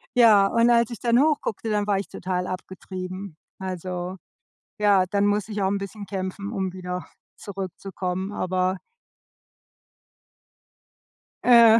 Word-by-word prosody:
ja, 215 -5 +7
und 230 +3 +3
als 235 -1 +4
ich 235 - -7
dann 235 0 +3
hoch 300 -1 +4
guckte, 225 +1 -3
dann 210 -1 +1
war 200 -2 +2
ich 200 - -5
total 180 0 -3
abgetrieben. 185 -1 -6 0.2
Also 185 -1 -4 0.6
ja, 205 -3 +5
dann 200 0 +2
musste 205 +1 0
ich 205 -1 -1
auch 190 - +3
'n 200 - +1
bisschen 200 +1 -7
kämpfen, 195 +1 -4
um 190 -4 -2
wieder 180 -1 -5 0.3
zurückzukommen, 190 0 -4
aber 185 -1 0 2.7
Äh. 235 -2 +8
195 Hz, 130 wpm, -25 LUFS, 185-210 Hz, 2.7 s, Äh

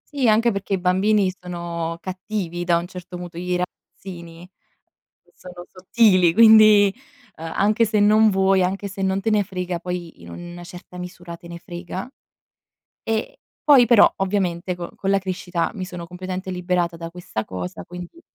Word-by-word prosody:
Sì, 260 -4 +2
anche 225 +2 +4
perché 200 0 -4
i - - +2
bambini 190 +1 +2
sono 170 -2 -5
cattivi 185 -2 -4
da 170 -1 +3
un 170 - -3
certo 180 0 -9
punto 175 -1 -8
i 180 0 -2
ragazzini 175 -1 -8 0.9
sono 180 -1 -11
sottili, 185 -2 +3
quindi, 215 -3 +7 0.4
ehm, 160 0 -6
anche 215 +3 +3
se 215 -1 +1
non 215 +1 +5
vuoi, 190 -1 +3
anche 195 +2 -1
se 195 0 -7
non 190 0 0
te 225 - 0
ne 210 -2 +3
frega, 180 -3 -4
poi 175 - -6
in 85 - -12
una 175 - -9
certa 180 0 -12
misura, 175 -1 -8
te 170 - -14
ne 170 0 -8
frega. 175 +3 -7 1.0
E, 225 0 -3 0.2
poi 275 -5 +7
però 235 -2 +6
ovviamente 185 -2 -1
con 175 -1 -6
con 195 - -4
la 195 - +4
crescita 180 -3 -3
mi 185 -3 -4
sono 175 -2 -8
completamente 185 +1 -6
liberata 180 -1 -1
da 165 0 -7
questa 170 -11 -5
cosa, 90 -1 -6
quindi 180 - -10
180 Hz, 165 wpm, -22 LUFS, 175-200 Hz, 1.0 s, quindi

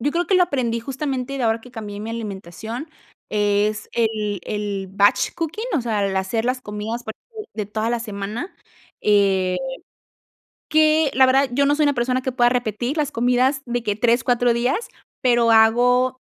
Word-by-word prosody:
Yo 290 +5 0
creo 345 +2 -1
que 385 - +2
lo 365 - +6
aprendí, 245 -8 -1
justamente, 270 +1 -3
de 255 - 0
ahora 225 0 +1
que 250 - -14
cambié 210 -3 -7
mi 220 +2 -5
alimentación, 220 - -6 0.4
es 210 +1 0
el 215 -4 -1
el 205 -2 -4
batch 200 +1 +2
cooking, 345 +8 -3
o 275 - +1
sea, 215 -4 -1
el 190 -1 -2
hacer 190 +4 -1
las 255 +1 0
comidas, 215 +2 -5
por 220 - -6
ejemplo, 440 -2 -12
de 210 -2 -3
toda 215 +2 -2
la 240 - -1
semana. 215 - -5 0.5
Eh, 195 -3 +2 1.1
que, 310 -1 +3
la 260 0 +5
verdad, 270 0 +3
yo 280 +2 +3
no 290 - +3
soy 305 - +2
una 285 -1 +3
persona 255 +1 0
que 260 - -1
pueda 245 -1 +3
repetir 245 +3 -2
las 300 -1 0
comidas 250 +3 +2
de 240 -1 -2
que 205 -2 -1
3, 235 +2 +2
4 245 -1 +2
días, 255 - 0 0.3
pero 240 -2 +3
hago 245 +3 +4
235 Hz, 185 wpm, -21 LUFS, 210-260 Hz, 1.1 s, lo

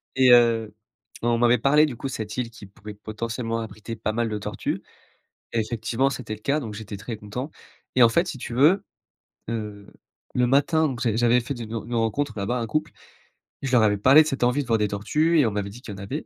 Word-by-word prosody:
et 130 -1 +5
heu, 115 -3 +4 0.5
on 120 0 +2
m'avait 120 +1 +4
parlé 150 +6 +4
du 135 -6 -5
coup 135 - -5
de - - -6
cette 110 -3 -5
île 125 -2 -2
qui 110 -2 -12
pouvait 105 +2 -11
potentiellement 115 +2 -4
abriter 110 +1 -7
pas 110 -1 -2
mal 115 +1 -1
de 105 - -2
tortues. - - -4 0.7
Effectivement 115 +3 0
c'était 120 -5 -5
le 110 - -13
cas 140 +6 +1
donc 110 -6 -6
j'étais 105 -1 -7
très 100 +3 -6
content 110 +7 -6 0.4
et 125 - +5
en 115 - +8
fait 170 +10 +2
si 170 - -5
tu 120 - -7
veux, 160 +11 +4 0.6
heu, 105 -3 -5 0.5
le 125 0 +3
matin 145 +5 +3
donc 125 -4 -5
j'a 115 -3 +1
j'avais 120 +1 +3
fait 130 +4 -4
de 120 - -7
une 110 - -11
une 115 +1 -4
rencontre 115 +5 0
là-bas, 105 +5 -1
un 115 - -2
couple, 155 +7 -1 0.7
je 135 - -3
leur 120 -3 +5
avais 105 -1 +3
parlé 135 +9 +7
de - - -5
cette 135 -4 -2
envie 125 +4 +2
de 125 - -14
voir 115 -2 +2
des 105 - +2
tortues 150 +12 +1
et 140 - +5
on 110 - +1
m'avait 100 -1 -3
dit 120 +5 -12
qu'il 105 - -8
y - - -8
en - - -7
avait. 135 +10 -5
115 Hz, 240 wpm, -24 LUFS, 110-130 Hz, 0.7 s, en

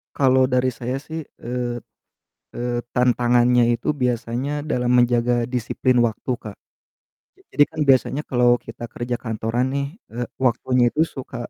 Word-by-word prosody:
Kalo 130 -1 +4
dari 125 0 +2
saya 125 +2 -4
sih, 160 +2 -6 0.2
eee 120 0 -2 0.8
eee, 120 0 -2 0.2
tantangannya 125 0 +3
itu 115 - -5
biasanya 125 +2 -1
dalam 125 -5 0
menjaga 120 0 +2
disiplin 125 +1 0
waktu, 115 +3 -5
Kak. 105 -2 -9 1.0
Jadi 145 - +5
kan 160 -1 -6
biasanya 135 +2 +3
kalo 120 -1 +4
kita 115 +1 -9
kerja 120 0 -3
kantoran 115 +2 -1
nih, 140 0 -1 0.3
eee, 120 +1 -3 0.2
waktunya 125 0 +2
itu 155 - +1
suka, 135 -5 -8
125 Hz, 135 wpm, -22 LUFS, 120-130 Hz, 1.0 s, Jadi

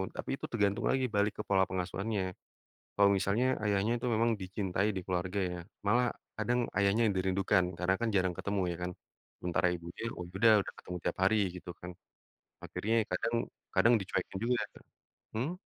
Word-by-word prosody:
tapi - - -5
itu - - -6
tergantung 100 -3 +1
lagi 130 -1 +2
balik 105 0 +2
ke - - -7
pola 95 -1 +4
pengasuhannya, 95 +1 -2 0.6
kalau 100 0 +5
misalnya 100 +6 +2 0.2
ayahnya 105 +2 +2
itu 125 - -3
memang 115 +2 +3
dicintai 95 +1 -1
di - - 0
keluarga 95 +1 -1
ya, 90 - -4 0.3
malah 120 +4 +4 0.3
kadang 120 +3 +1 0.2
ayahnya 100 +3 +3
dirindukan 95 0 +2
karena 90 +2 +2
kan 115 - +1
jarang 95 -2 +2
ketemu 100 0 -1
ya 85 - -3
kan 90 - -3 0.5
sementara 90 0 +1
ibunya, 85 +3 -8 0.2
oh 90 - -4
ya 90 - -17
udah 115 +2 +6 0.2
udah - - -6
ketemu 90 - -5
tiap - - -1
hari 100 +3 +4 0.2
gitu 90 - -8
kan, 90 - -7 0.7
akhirnya 110 +3 -1 0.2
kadang 115 +6 0 0.4
kadang 120 - +5
dicuekin 95 0 -3
juga. 120 +1 +2 0.8
Hmm? 130 +9 0
100 Hz, 170 wpm, -32 LUFS, 90-110 Hz, 0.8 s, udah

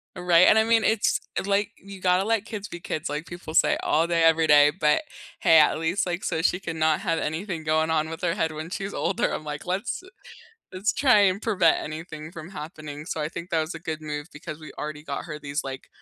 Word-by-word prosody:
Right, 180 -1 +5
and 220 - +6
I 220 - +3
mean, 230 -1 +3
it's, 220 -1 +2 0.2
like, 200 0 +1
you 195 -1 -12
gotta 185 +1 +3
let 225 -2 +1
kids 210 -2 -6
be 175 - -9
kids, 155 -3 -3
like 150 +3 -4
people 175 -2 -8
say - - +4
all 165 +2 +2
day, 170 -1 +2
every 165 0 +5
day, 145 -1 +7
but 150 - +2 0.4
hey, 165 - +6
at 155 0 +5
least, 170 +5 0
like, 175 +1 -3
so 160 - -1
she 180 +1 +1
can 165 -3 -5
not 155 -1 +2
have 165 -5 -1
anything 160 +2 -3
going 155 +1 +1
on 160 0 +1
with 165 - -7
her 170 -1 +1
head 160 -4 0
when 155 +2 -6
she's 195 +1 -4
older, 180 +2 0
I'm 155 - -4
like, 150 +2 -6
"Let's 190 - -2 0.7
let's 195 +5 0
try 255 -7 +4
and 195 +1 +2
prevent 195 -7 +3
anything 155 0 -7
from 170 +1 -9
happening." 155 -4 -8
So, 155 - -4
I 150 - -1
think 170 +1 -8
that 165 -1 +2
was 155 +2 -4
a 165 - -7
good 160 -2 -4
move 150 +1 -5
because 150 +1 -8
we 155 - -10
already 150 0 -5
got 140 -2 -5
her 150 -2 -7
these, 145 +1 -3
like, 135 0 -7
165 Hz, 235 wpm, -25 LUFS, 155-185 Hz, 0.7 s, day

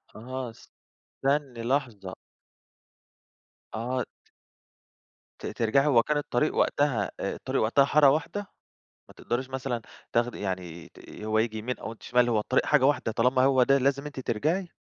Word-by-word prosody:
آه 130 +2 -5 0.5
استنّي 135 -4 -2
لحظة 120 -7 -2 1.6
آه 125 +3 -2
ت - - -13 1.3
ت - - -8
ترجعي 120 +5 +1
هو 120 -5 +5
كان 150 0 0
الطريق 145 0 0
وقتها 125 -9 +1
آآ، - - -2
الطريق - - -2
وقتها 125 +6 +4
حارة 145 -1 +5
واحدة؟ 160 +8 -1 0.7
ما - - -16
تقدَريش 130 +2 -3
مثلًا 130 -3 -3 0.3
تاخدي 120 +1 0
يعني 90 -4 -5
ت - - -15
ي 105 - -9
هو 110 0 +1
ييجي 110 -1 0
يمين 125 +4 -4
أو 110 - -6
أنتِ 115 - -16
شمال، 125 0 +2
هو 115 -3 +2
الطريق 130 +5 +1
حاجة 145 -3 +4
واحدة 140 -5 +2
طالما 125 +3 +2
هو 130 -2 +4
ده 135 +2 +4
لازم 140 +2 0
أنتِ 140 -3 -6
ترجعي؟ 155 - -1
125 Hz, 160 wpm, -27 LUFS, 115-140 Hz, 1.6 s, هو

